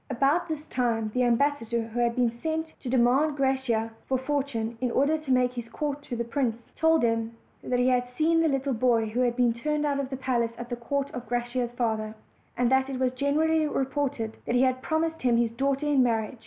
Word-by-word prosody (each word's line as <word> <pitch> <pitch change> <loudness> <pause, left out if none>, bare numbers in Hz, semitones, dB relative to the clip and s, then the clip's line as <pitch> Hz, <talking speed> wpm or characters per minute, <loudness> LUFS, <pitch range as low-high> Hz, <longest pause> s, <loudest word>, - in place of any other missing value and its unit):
About 275 +6 +2
this 310 -2 -4
time 230 -6 -1
the 250 - +1
ambassador 240 -2 +1
who 235 +2 -4
had 235 -1 +1
been 245 -2 +2
sent 320 +6 -3
to 255 - -6
demand 260 +4 +3
Graciosa 265 -5 0 0.2
for 260 - +1
Fortune, 260 -4 -2
in 250 - +1
order 280 +6 +2
to 300 -3 -4
make 250 -1 +3
his 240 -2 -6
court 290 +3 -3
to 265 -4 -6
the 235 - -1
prince, 235 -1 -2
told 320 -1 +3
him 230 0 0 0.3
that 250 - 0
he 250 +1 +2
had 250 -1 +2
seen 320 +6 +2
the 325 - +3
little 270 -1 0
boy 230 -1 +2
who 220 +3 -3
had 245 -1 +2
been 245 -2 +3
turned 300 +5 -1
out 285 -1 0
of 275 -2 -3
his 265 - -4
palace 240 -3 0
at 240 0 -7
the 240 - -2
court 275 +4 -2
of 245 -1 -7
Graciosa's 240 0 -2
father, 220 -2 -1 0.4
and 245 0 +2
that 265 0 +3
it 265 - -3
was 255 -1 +2
generally 310 +4 +1
reported 270 -5 -2
he 245 +2 +3
had 255 0 +1
promised 320 +2 -1
him 245 -2 +3
his 235 -1 +1
daughter 275 +4 -1
in 290 -3 +3
marriage. 225 -1 0
255 Hz, 220 wpm, -27 LUFS, 235-280 Hz, 0.4 s, demand